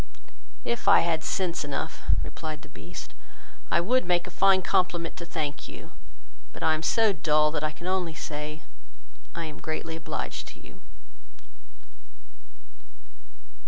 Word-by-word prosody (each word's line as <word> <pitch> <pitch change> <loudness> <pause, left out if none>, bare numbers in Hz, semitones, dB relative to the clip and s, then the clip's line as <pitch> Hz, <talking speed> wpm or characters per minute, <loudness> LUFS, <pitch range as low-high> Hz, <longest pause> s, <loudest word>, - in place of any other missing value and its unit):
"If 235 0 -1
I - - +8
had 165 -2 +1
sense 180 -5 0
enough, 145 -2 -3 0.2
(replied 155 -3 -5
the 150 - -12
Beast,) 175 +4 -9 0.6
I - - +4
would 250 +9 +3
make 175 -1 +2
a 180 - -8
fine 190 0 +5
compliment 175 -2 +1
to 170 - -6
thank 150 -3 -3
you, - - -10 0.6
but - - -7
I 160 - +5
am 155 - -1
so 220 +5 +4
dull, 150 -2 +3
that 150 -1 -1
I 155 - +2
can 155 +3 -11
only 180 -3 0
say, 150 0 -5 0.7
I 170 - -2
am 155 -2 -7
greatly 160 +1 -3
obliged 160 - -4
to - - -11
you." - - -15
165 Hz, 145 wpm, -28 LUFS, 155-180 Hz, 0.7 s, I